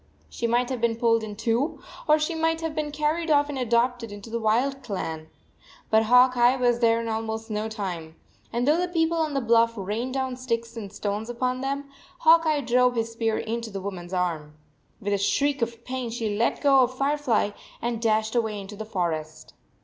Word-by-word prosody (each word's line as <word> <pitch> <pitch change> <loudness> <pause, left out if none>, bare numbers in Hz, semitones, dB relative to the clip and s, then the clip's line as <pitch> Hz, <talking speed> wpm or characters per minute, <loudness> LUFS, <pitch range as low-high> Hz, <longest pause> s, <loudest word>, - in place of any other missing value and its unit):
She 235 - -2
might 240 +2 +1
have 250 -3 -3
been 235 -1 +2
pulled 230 -1 +2
in 210 -1 -6
two, 230 - 0 0.3
or 305 0 +6
she 305 +2 -1
might 325 0 0
have 325 -1 -3
been 305 -1 -2
car 300 +1 +1
ried 335 -1 -4
off 290 -1 +4
and 280 -2 -3
adopted 240 -1 +1
into 205 +2 -9
the 235 - -1
wild 245 +5 +1
clan. 160 -7 -5 0.6
But 220 0 +4
Hawk 250 +2 +6
Eye 245 +1 +5
was 245 -2 +2
there 230 -1 +3
in 230 - -4
almost 220 0 -3
no 215 +1 -2
time, 180 -7 -5 0.4
and 240 +2 -1
though 310 +3 +4
the 360 - 0
people 335 -1 +1
on 310 -3 0
the 275 - +1
bluff 230 0 +4
rained 220 +7 -3
down 260 -2 -2
sticks 230 -2 -3
and 205 -4 -7
stones 210 +2 -3
upon 250 +1 -1
them, 275 +1 -3 0.3
Hawk 330 0 +6
Eye 305 -2 +2
drove 250 0 +3
his 230 0 -1
spear 225 -1 -1
into 230 0 -3
the 195 -2 -5
woman 190 -2 -6
s 175 - -11
arm. 165 -5 -2 0.4
With 205 -2 -2
a 200 - +1
shriek 275 +8 +1
of 230 0 -3
pain 255 -2 -3
she 225 -3 -2
let 230 +3 0
go 275 -2 +5
of 255 0 +2
Firefly 275 -7 +1 0.3
and 235 -1 -2
dashed 220 -1 +1
away 220 -4 0
into 200 +1 -8
the 220 +1 -6
forest. 160 -6 -3
235 Hz, 210 wpm, -25 LUFS, 215-265 Hz, 0.6 s, or